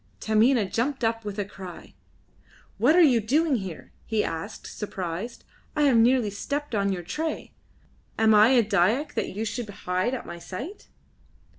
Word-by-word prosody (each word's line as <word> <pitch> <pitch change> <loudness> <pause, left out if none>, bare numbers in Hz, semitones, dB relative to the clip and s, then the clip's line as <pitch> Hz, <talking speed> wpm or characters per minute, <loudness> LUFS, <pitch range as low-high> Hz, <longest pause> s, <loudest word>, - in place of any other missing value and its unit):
Taminah 220 +1 +3
jumped 250 +7 -2
up 225 0 0
with 205 -1 -6
a 205 - -1
cry. 190 -3 -10 0.9
"What 260 +9 +5
are 355 - +7
you 250 -7 +5
doing 285 +5 +2
here?" 190 -6 -7
he 220 -2 0
asked, 165 +7 -5
surprised. 195 +2 -5 0.3
"I 300 - +2
have 270 -5 +5
nearly 235 -2 +4
stepped 285 +7 -4
on 200 -2 +1
your 180 -2 -3
tray. 310 - -4 0.6
Am 220 0 +4
I 210 +1 +7
a 245 -2 +5
Dyak 215 - +1
that - - -3
you 220 +2 -2
should 220 +1 -4
hide 185 +5 -1
at 250 - -7
my 170 0 -8
sight?" 255 - -8
220 Hz, 165 wpm, -26 LUFS, 200-260 Hz, 0.9 s, are